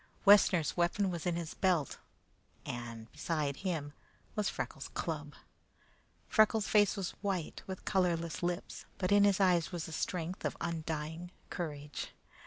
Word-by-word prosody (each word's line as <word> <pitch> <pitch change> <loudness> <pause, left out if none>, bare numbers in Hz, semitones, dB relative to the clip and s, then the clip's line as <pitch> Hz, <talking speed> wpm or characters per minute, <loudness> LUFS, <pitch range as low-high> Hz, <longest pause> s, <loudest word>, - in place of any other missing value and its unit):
Wessner's 185 -6 +6
weapon 180 +3 +2
was 170 -1 -3
in 175 - +1
his 170 -2 -4
belt, 175 -7 +1 0.7
and 115 -2 -6
beside 150 -4 -1
him 160 -7 -2 0.4
Freckles' 210 -2 -2
club. - - -3 0.9
Freckles' 215 -1 +4
face 205 -1 +4
was 190 -2 -2
white, 190 -6 -2
with 190 -1 -6
colorless 170 -4 +1
lips, 175 +1 -3
but 185 0 -1
in 205 0 +7
his 200 -1 +4
eyes 180 -4 +3
was 175 -3 -3
the - - -8
strength 175 +2 -3
of - - -2
undying 160 +1 -3 0.2
courage. 150 -5 -5
175 Hz, 135 wpm, -33 LUFS, 160-190 Hz, 0.9 s, in